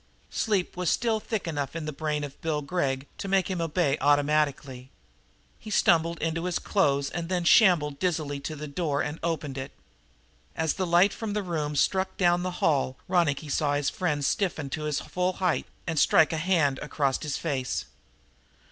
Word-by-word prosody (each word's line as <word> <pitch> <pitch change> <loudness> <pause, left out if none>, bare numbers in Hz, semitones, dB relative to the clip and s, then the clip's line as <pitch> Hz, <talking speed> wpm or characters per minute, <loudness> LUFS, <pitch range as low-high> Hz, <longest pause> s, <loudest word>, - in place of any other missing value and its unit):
Sleep 200 -5 0
was 180 -2 0
still 225 -2 +1
thick 215 -3 -4
enough 145 -2 -3
in 165 -2 -4
the 155 - -4
brain 150 0 -2
of 140 -1 -8
Bill 155 -2 -1
Gregg 140 -4 -1
to - - -4
make 195 0 +1
him 180 -2 -2
obey 165 -3 +1
automatically. 145 -3 +1 0.7
He 220 - -10
stumbled 170 -4 +3
into 165 +1 -2
his 180 -2 0
clothes 140 -8 +1
and 170 -1 -4
then 180 -2 0
shambled 165 -7 +4
dizzily 155 -6 -1
to 155 +3 -5
the 150 +1 -6
door 145 -1 -1
and 150 +2 -4
opened 150 -5 -3
it. 130 - -6 0.8
As 160 -1 0
the 185 -2 -2
light 175 +4 +4
from 220 -2 -4
the 210 -1 -1
room 155 -5 -2
struck 190 +6 +1
down 175 -1 +3
the 185 - -2 0.2
hall 135 -4 +1
Ronicky 165 -5 +1
saw 145 0 +1
his 145 -1 0
friend 150 -6 -1
stiffen 155 -4 -1
to 155 +1 -3
his 150 -2 0
full 180 +1 -1
height 180 -2 0 0.2
and 165 -3 -1
strike 160 +2 +5
a - - -1
hand 155 -5 +1
across 140 -3 -1
his 150 -2 -2
face. 135 - -2
160 Hz, 185 wpm, -27 LUFS, 145-180 Hz, 0.8 s, strike